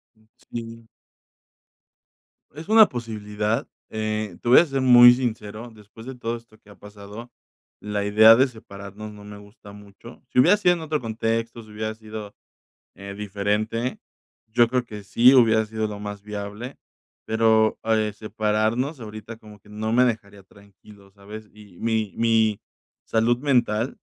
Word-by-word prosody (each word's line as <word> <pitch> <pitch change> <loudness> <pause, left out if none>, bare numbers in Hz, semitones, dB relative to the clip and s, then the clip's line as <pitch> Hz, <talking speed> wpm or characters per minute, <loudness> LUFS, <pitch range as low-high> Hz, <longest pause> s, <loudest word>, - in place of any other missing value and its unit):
Um, 110 0 -30
sí. 115 -1 -9 1.7
Es 155 +4 -10
una 220 0 +6
posibilidad, 110 -2 -3 0.2
eh, 110 -3 -4
te 120 - -3
voy 125 - +8
a - - +4
ser 135 -3 -3
muy 120 -1 +8
sincero, 120 -2 -5
después 110 +1 -15
de 130 0 -8
todo 120 -1 -4
esto 115 -2 -15
que 105 - -23
ha 100 - -15
pasado, 105 +3 -12 0.5
la 105 -1 -3
idea 110 +2 +7
de 130 +3 +4
separarnos 105 -2 -11
no 105 0 -13
me 105 0 -11
gusta 105 0 -15
mucho. 105 +3 -15
Si - - -7
hubiera 175 +11 +5
sido 180 -4 +3
en 170 - -7
otro 155 -1 -2
contexto, 115 0 -3
si 110 - -17
hubiera 110 +1 -5
sido, 110 -2 -9 0.6
eh, 100 0 -9
diferente, 105 +4 -2 0.5
yo 120 +2 +3
creo 125 +1 -1
que 105 -3 -10
sí 120 +6 +5
hubiera 115 -4 +4
sido 110 0 -3
lo 105 -1 -7
más 105 -1 -7
viable, 105 +4 -7 0.5
pero, 110 0 +2
eh, 110 -1 0
separarnos 110 +6 -2
ahorita 110 0 -9
como 105 -2 -16
que 105 - -22
no 110 +1 -4
me 125 +2 +4
dejaría 100 -4 -4
tranquilo, 100 +1 -19
¿sabes? 105 +2 -12
Y 105 -4 -17
mi 110 -3 -1
mi 110 -2 +2 0.4
salud 115 +2 +1
mental 120 -4 0
110 Hz, 155 wpm, -23 LUFS, 105-115 Hz, 1.7 s, voy